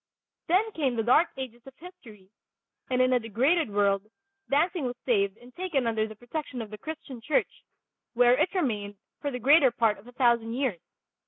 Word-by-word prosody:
Then 395 +6 +2
came 275 - -1
the 225 - 0
Dark 280 +9 +4
Ages 245 -3 -7
of 265 - -12
history, 230 - -14 0.6
and 255 0 +3
in 255 0 +2
a 250 - +4
degraded 250 - +1
world 200 0 +1 0.4
dancing 315 +3 +1
was 245 0 -3
saved 200 -4 +1
and 245 +1 -17
taken 345 -9 -1
under 220 -1 0
the 220 - -10
protection 250 +3 -6
of 220 -2 -6
the 215 - -7
Christian 280 -6 -8
church, 285 +4 -1 0.5
where 245 +1 +5
it 305 +7 +1
remained 210 - -2 0.2
for 290 - -2
the 250 - -4
greater 275 +3 +5
part 230 -3 +1
of 210 - -17
a - - -11
thousand 235 -2 +2
years. 250 -11 -1
245 Hz, 185 wpm, -27 LUFS, 220-285 Hz, 0.6 s, where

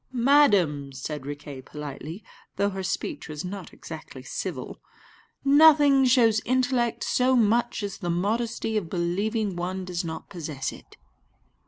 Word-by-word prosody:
"Madam," 205 - +3
said 135 +1 -6
Riquet 145 -2 -7
politely, 150 +6 -8 0.3
though 200 +1 +1
her 190 0 -4
speech 190 -3 -3
was 150 +2 -5
not 195 +2 -7
exactly - - -10
civil, - - -5 0.6
"nothing 290 -2 +6
shows 230 -4 +4
intellect 250 -2 +1
so 255 +1 +2
much 230 -1 +2
as 200 -1 -5
the 175 -4 -3
modesty 220 +5 -1
of 180 -6 -3
believing 195 +4 -1
one 185 +2 -3
does 180 -1 -3
not 160 -1 -6
possess 150 -6 -4
it." - - -15
200 Hz, 135 wpm, -26 LUFS, 165-240 Hz, 0.6 s, nothing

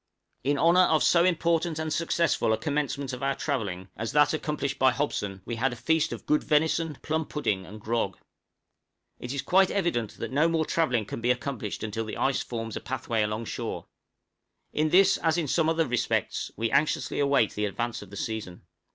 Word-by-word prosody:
In 140 +2 +1
honor 170 +5 +5
of 155 -1 +3
so 170 -1 +5
important 170 -2 +1
and 160 -1 -2
successful 165 -7 +1
a - - +1
commencement 140 -2 -2
of 125 - -6
our 135 0 0
travelling, 100 -10 -3
as 110 +2 -4
that 150 +1 +4
accomplished 150 -3 -2
by 130 - +6
Hobson, 100 -10 -2
we 115 - -4
had 130 +3 +1
a - - -5
feast 160 +6 +1
of - - -7
good 150 - +2
venison, 160 +1 +1
plum 160 +1 0
pudding, 100 -11 -2
and 110 +3 -10
grog. 110 -3 -1 1.0
It 125 - -6
is 140 -1 -3
quite 190 +1 +4
evident 170 - -1
that - - -5
no 150 +5 +3
more 165 -1 +1
travelling 125 -11 +1
can 110 - -6
be 120 - 0
accomplished 125 -4 -2
until 110 +1 -3
the 110 - -6
ice 135 0 +1
forms 115 -2 -5
a - - -4
pathway 120 -3 -2
alongshore; 105 +2 -3 0.9
in 155 +1 +1
this, 195 +3 +5
as 165 0 +1
in 165 -4 0
some 160 +3 +2
other 165 0 +2
respects, 125 -3 -1
we 115 +1 -1
anxiously 145 +3 +1
await 140 -6 +3
the 105 - -1
advance 120 +3 -3
of 105 - -11
the 100 - -9
season. 110 -8 -5
140 Hz, 195 wpm, -27 LUFS, 115-160 Hz, 1.0 s, by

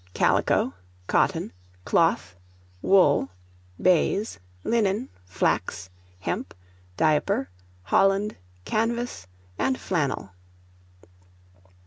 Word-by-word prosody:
CALICO, 90 - +2 0.3
COTTON, - - +1 0.3
CLOTH, 95 +1 +2 0.5
WOOL, 165 - +4 0.5
BAIZE, 185 - +2 0.2
LINEN, 225 +2 +1 0.2
FLAX, 95 0 -1 0.3
HEMP, - - -3 0.4
DIAPER, 150 -5 +2 0.3
HOLLAND, 195 - +2 0.3
CANVAS, 235 - -1 0.3
AND 260 - +1
FLANNEL. 140 - -1
190 Hz, 65 wpm, -25 LUFS, 135-215 Hz, 0.5 s, WOOL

